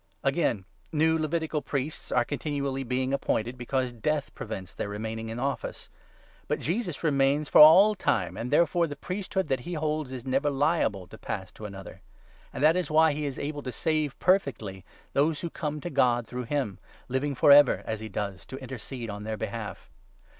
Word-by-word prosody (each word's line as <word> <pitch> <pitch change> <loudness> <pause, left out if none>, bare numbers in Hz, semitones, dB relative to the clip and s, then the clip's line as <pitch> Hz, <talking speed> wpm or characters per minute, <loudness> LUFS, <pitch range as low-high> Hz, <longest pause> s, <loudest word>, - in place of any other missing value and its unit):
Again, 135 - +1 0.3
new 160 0 +3
23 160 0 +1
Levitical 155 -1 -1
priests 145 +2 -4
are - - +3
continually 140 -2 -2
being 130 +1 -1
appointed, 120 -3 -1
because 125 +1 -1
death 145 +5 -2
prevents 95 -4 -7
their 100 - -4
remaining 110 +2 -4
in 115 - -5
office; 135 +2 -3 0.6
but - - -1
Jesus 175 -2 -2
remains 145 -1 +2
for - - +8
all 185 +8 +9
24 - - -10
time, 105 - 0
and 120 - -4
therefore 170 +3 +3
the 145 - -6
priesthood 190 +3 -3
that 135 -2 0
he 175 +8 -5
holds 155 -3 -2
is 130 -1 -7
never 135 +3 +1
liable 140 - +1
to 110 - -13
pass 95 -3 -5
to 110 - -10
another. 95 -2 -10 0.5
And - - -4
that 155 +2 +6
is 180 -3 -1
why 155 0 +5
he 150 0 -2
is 135 - -5
able 145 0 -4
to 130 - -5
save 155 -1 -1
25 - - -40
perfectly 115 - 0 0.3
those 150 +2 +2
who 170 - -4
come 150 -1 -3
to 175 - -5
God 120 -4 +2
through 125 +2 -5
him, 130 -7 -2 0.3
living 135 +2 -1
for 140 - +5
ever, 145 -1 +7
as 110 -1 -3
he 110 0 -7
does, 100 -5 -4
to 135 - -7
intercede 130 -3 -6
on 105 0 -7
their 110 0 -3
behalf. 110 0 -6
135 Hz, 195 wpm, -28 LUFS, 115-155 Hz, 0.6 s, all